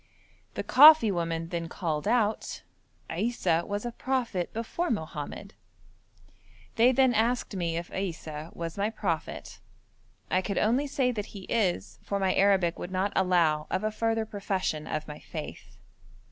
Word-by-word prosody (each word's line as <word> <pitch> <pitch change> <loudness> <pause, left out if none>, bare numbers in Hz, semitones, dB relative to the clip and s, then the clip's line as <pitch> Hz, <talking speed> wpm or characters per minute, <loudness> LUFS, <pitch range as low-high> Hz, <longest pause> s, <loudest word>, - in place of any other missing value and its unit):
The - - -2
coffee 295 -5 +8
woman 165 -2 -2
then 170 -1 -3
called 155 -5 -3
out, 220 -3 0 0.5
'Issa 170 -3 0
was 205 +2 -3
a 240 - -2
prophet 235 -9 -2
before 230 +10 -3
Mohammed.' 160 +1 -4 1.2
They 240 +2 +5
then 260 -1 +4
asked 230 0 0
me 170 -3 -1
if 170 +1 -6
Issa 160 -4 -5
was 170 +2 -6
my 205 +2 +1
prophet. 185 -7 -4 0.7
I 185 - +3
could 200 +1 -3
only 250 +7 +2
say 265 -2 +1
that 210 -3 -4
He 195 - -9
is, 195 -6 -1
for 200 - -2
my 190 -1 +2
Arabic 190 -4 +3
would 175 - -5
not 190 +2 -1
allow 170 -5 +2
of 185 - -1
a 215 - 0
further 225 0 0
profession 190 -7 -3
of 155 0 -3
my 150 -1 -8
faith. - - -8
195 Hz, 150 wpm, -28 LUFS, 170-225 Hz, 1.2 s, coffee